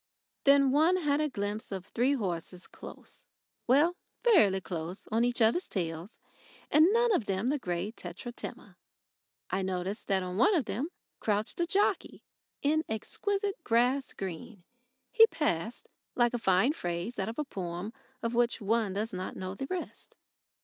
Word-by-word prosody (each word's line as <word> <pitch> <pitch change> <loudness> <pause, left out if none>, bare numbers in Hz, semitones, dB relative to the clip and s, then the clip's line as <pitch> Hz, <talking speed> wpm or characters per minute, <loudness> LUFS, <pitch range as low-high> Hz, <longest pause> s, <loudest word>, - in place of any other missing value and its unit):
Then 275 -1 +6
one 320 +6 +4
had 295 -4 +1
a 305 - +1
glimpse 205 -3 -4
of 190 -2 -4
three 250 +6 +1
horses 180 -6 -3
close - - -11 0.4
well, 300 +8 +4 0.3
fairly 215 - +5
close 170 +1 -6
on 225 +2 +3
each 240 -1 +2
other's 235 +12 +3
tails, 170 +1 -4 0.5
and 315 +5 +6
none 470 0 +4
of 240 - 0
them 195 +2 -1
the 290 +1 0
grey 180 -1 -2
Tetratema. 225 +4 -8 0.7
I 190 - 0
noticed 190 +2 -3
that 190 -2 +2
on 180 0 -4
one 395 - +5
of 300 -8 +1
them 270 +10 -2 0.3
crouched 210 +5 -1
a 345 - +1
jockey 400 +4 0 0.4
in 310 +2 +2
exquisite 395 - -2
grass 250 +4 +2
green. 190 +2 -7 0.5
He 450 -2 +8
passed 240 - -2 0.3
like 240 -1 +3
a 245 - -1
fine 195 +7 +3
phrase 175 - -4
out 195 +2 -1
of 230 - -7
a 300 - 0
poem 185 -2 -5 0.3
of 230 +1 -1
which 240 +1 +2
one 215 -1 +1
does 210 +2 -2
not 185 0 -4
know 185 0 -4
the 270 +7 -5
rest. 370 +2 -6
230 Hz, 160 wpm, -30 LUFS, 190-290 Hz, 0.7 s, He